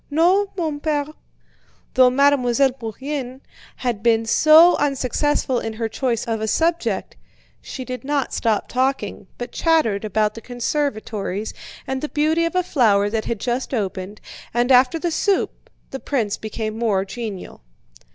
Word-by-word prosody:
"No, 355 +7 +3
mon 315 -4 -2
père." 295 -1 -1 0.8
Though 255 -1 +6
Mademoiselle 270 -1 +3
Bourienne 260 +2 -6 0.4
had 240 -5 -3
been 225 -1 +2
so 315 +9 +6
unsuccessful 275 -1 0
in 225 - -4
her 225 +1 -2
choice 235 +1 -2
of 225 -2 -2
a 220 - -1
subject, 330 +9 0 0.5
she 260 - -7
did 255 0 -6
not 280 -1 -1
stop 220 -3 0
talking, 255 -7 -1
but 245 0 -6
chattered 310 -12 +1
about 215 0 0
the 230 - -9
conservatories 225 -6 -3 0.3
and 265 0 -3
the 300 - -3
beauty 315 +2 +1
of 335 - -3
a 365 - +2
flower 210 - +2
that 220 -1 -1
had 230 - -3
just 250 +4 -2
opened, 195 -1 -4 0.4
and 240 +2 +2
after 255 +5 +5
the 340 +1 -2
soup 390 +4 -1 0.2
the 270 - -5
prince 230 -9 -1
became 220 0 -5
more 205 -5 +1
genial. 210 -3 -7
250 Hz, 150 wpm, -21 LUFS, 220-290 Hz, 0.8 s, Though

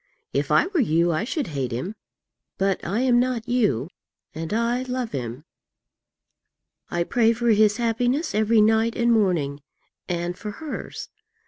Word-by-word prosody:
If - - 0
I - - +4
were 370 -2 -1
you, 170 - +2
I 160 +5 0
should 270 - -2
hate 135 -5 -3
him; 130 - -3 0.6
but 195 -1 0
I 205 +7 -1
am 250 -2 +4
not 245 -2 -1
you, 210 - +1 0.5
and 160 +1 -5
I 235 +3 +1
love 255 -2 -3
him. 125 0 -5 1.5
I 175 0 0
pray 230 +5 +3
for 240 +1 0
his 215 -1 +4
happiness 245 +7 0
every 220 +1 +3
night 220 +2 +3
and 235 0 +2
morning, 170 -10 +1 0.5
and 175 0 -2
for 210 +3 -7
hers. 310 +5 -6
220 Hz, 150 wpm, -24 LUFS, 170-240 Hz, 1.5 s, I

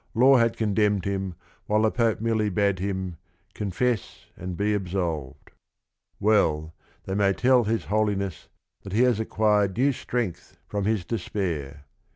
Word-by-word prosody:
Law 130 +3 +6
had 115 -1 +2
condemned 105 -2 +1
him 95 -2 -2 0.3
while 105 +1 +2
the 110 - +3
Pope 115 -2 +1
merely 110 -1 +1
bade 100 0 +1
him, 95 -2 -3 0.4
"Confess 110 +2 -2
and 90 0 -6
be 105 +2 +1
absolved." 85 -8 -3 0.7
Well, 80 -7 +2 0.3
they 95 - -3
may 100 0 +3
tell 125 +2 +3
"his 110 +1 -1
Holi 105 0 +1
ness, 95 -3 -5 0.3
that 100 - -8
he 115 +4 +4
has 125 -4 +3
acquired 105 -3 +1
new 135 +3 +4
strength 115 -8 -4
from 100 -1 -2
his 105 -4 0
despair." 80 - -3
105 Hz, 150 wpm, -25 LUFS, 95-110 Hz, 0.7 s, Law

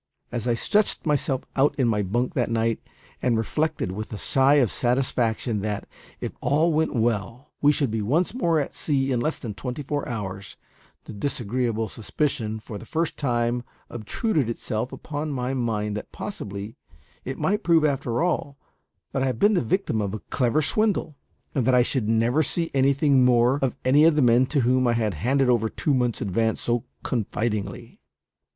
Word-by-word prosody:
As 120 0 -3
I 120 - +2
stretched 205 - +1
myself 145 -3 0
out 140 +2 +3
in 130 -4 +1
my 105 -2 +1
bunk 120 - -1
that 125 -6 0
night, 115 0 0 0.4
and 120 -3 +2
reflected 150 -1 -1
with 110 +3 -6
a 110 - -4
sigh 135 +6 +4
of 130 -7 +3
satisfaction 120 -4 0
that, 105 -1 -3 0.3
if - - -4
all 155 +3 +2
went 155 -1 +1
well, 115 +3 -1
we 145 - +6
should 140 -5 0
be 110 0 -1
once 150 - +1
more 170 -10 +2
at 140 - -3
sea 140 -2 0
in 125 - +1
less 155 +6 -1
than 110 -4 -6
twenty 125 +6 -5
four 145 +1 -3
hours, 100 -4 -5 0.5
the - - -9
disagreeable 115 -1 -1
suspicion 110 0 -2
for 105 -1 -8
the - - -11
first 165 +5 -1
time 120 -3 0 0.3
obtruded 130 - -1
itself 115 +1 -3
upon 155 0 -5
my 130 -2 -2
mind 110 -5 -1
that 105 - -6
possibly 105 - -6 0.5
it 130 - -5
might 210 +2 0
prove 165 -4 +4
after 135 -2 0
all 145 -5 -1 0.5
that 135 - -1
I 135 - +2
had 125 -3 -1
been 205 - +4
the 185 - +2
victim 120 - 0
of 100 0 -2
a - - -5
clever 135 +4 +2
swindle, 205 -2 0 0.4
and 135 - +1
that 130 - +5
I 125 - +6
should 120 -4 -1
never 115 +6 +3
see 165 +3 -1
anything 140 0 +4
more 125 +2 +4
of 135 -1 0
any 145 +4 +6
of 165 -2 +5
the 150 - +3
men 120 +1 +5
to 140 +1 +1
whom 125 +1 +3
I 120 - +3
had 110 -3 0
handed 130 - +1
over 115 -3 +2
two 145 - -1
months' 125 -3 0
advance 110 +3 0
so 120 -1 -1 0.2
confidingly. 110 -3 -3
125 Hz, 185 wpm, -25 LUFS, 115-145 Hz, 0.5 s, we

